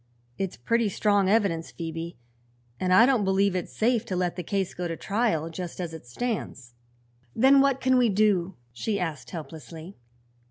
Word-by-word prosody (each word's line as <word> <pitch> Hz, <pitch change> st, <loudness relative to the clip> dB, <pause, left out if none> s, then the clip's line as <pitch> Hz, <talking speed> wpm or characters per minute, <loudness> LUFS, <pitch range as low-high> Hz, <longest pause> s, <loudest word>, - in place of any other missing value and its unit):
"It's 190 Hz, -2 st, -3 dB
pretty 230 Hz, -, +1 dB
strong 200 Hz, -1 st, +2 dB
evidence, 195 Hz, -7 st, +1 dB
Phoebe, 165 Hz, 0 st, -6 dB, 0.6 s
and 185 Hz, -, 0 dB
I 225 Hz, +6 st, +8 dB
don't 250 Hz, -5 st, +2 dB
believe 195 Hz, 0 st, +2 dB
it's 180 Hz, -, -3 dB
safe 235 Hz, 0 st, +1 dB
to 185 Hz, -, -3 dB
let 180 Hz, -1 st, -1 dB
the 180 Hz, -, -4 dB
case 195 Hz, +1 st, -2 dB
go 180 Hz, 0 st, -3 dB
to 165 Hz, -1 st, -4 dB
trial 195 Hz, -7 st, 0 dB
just 175 Hz, +1 st, -6 dB
as 170 Hz, -3 st, -4 dB
it 160 Hz, -6 st, -10 dB
stands." 135 Hz, -, -4 dB, 0.6 s
"Then 270 Hz, +3 st, +6 dB
what 275 Hz, -1 st, +2 dB
can 260 Hz, -1 st, +3 dB
we 240 Hz, -2 st, +4 dB
do?" 195 Hz, -3 st, +2 dB, 0.2 s
she 200 Hz, -, -2 dB
asked 160 Hz, -6 st, -4 dB
helplessly. 160 Hz, +2 st, -9 dB
190 Hz, 170 wpm, -26 LUFS, 165-220 Hz, 0.6 s, I